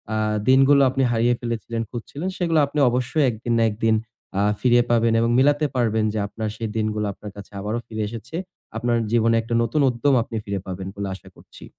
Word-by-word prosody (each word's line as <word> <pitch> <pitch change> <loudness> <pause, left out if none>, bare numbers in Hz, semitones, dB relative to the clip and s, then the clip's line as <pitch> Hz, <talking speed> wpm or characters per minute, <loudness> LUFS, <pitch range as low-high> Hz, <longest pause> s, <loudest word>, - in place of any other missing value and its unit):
আ - - 0 0.3
দিনগুলো 135 +2 +6
আপনি 135 +1 0
হারিয়ে 120 +1 +2
ফেলেছিলেন, 115 -1 -3
খুঁজছিলেন, 140 +9 -5
সেগুলো 165 -3 +2
আপনি 145 +1 -3
অবশ্যই 125 +5 +1
একদিন 115 +1 -3
না 115 - +3
একদিন 110 +1 +1 0.4
আ - - +3 0.2
ফিরিয়ে 120 -1 +4
পাবেন 115 -1 +3
এবং 115 0 +2
মিলাতে 145 +3 +3
পারবেন 110 -3 +1
যে 110 - -1
আপনার 110 +1 -4
সেই 115 -2 -3
দিনগুলো 105 -1 -1
আপনার 105 +1 -10
কাছে 100 -1 -11
আবারো 105 +3 -2
ফিরে 110 -1 -3
এসেছে। 115 +7 -8 0.4
আপনার 120 +1 +1
জীবনে 115 -1 +3
একটা 115 +1 -5
নতুন 115 +6 0
উদ্যম 125 +3 +1
আপনি 115 - -9
ফিরে 100 -1 -3
পাবেন 95 0 -5
বলে 100 -1 -4
আশা 95 0 -15
করছি। - - -15
115 Hz, 195 wpm, -23 LUFS, 110-125 Hz, 0.4 s, দিনগুলো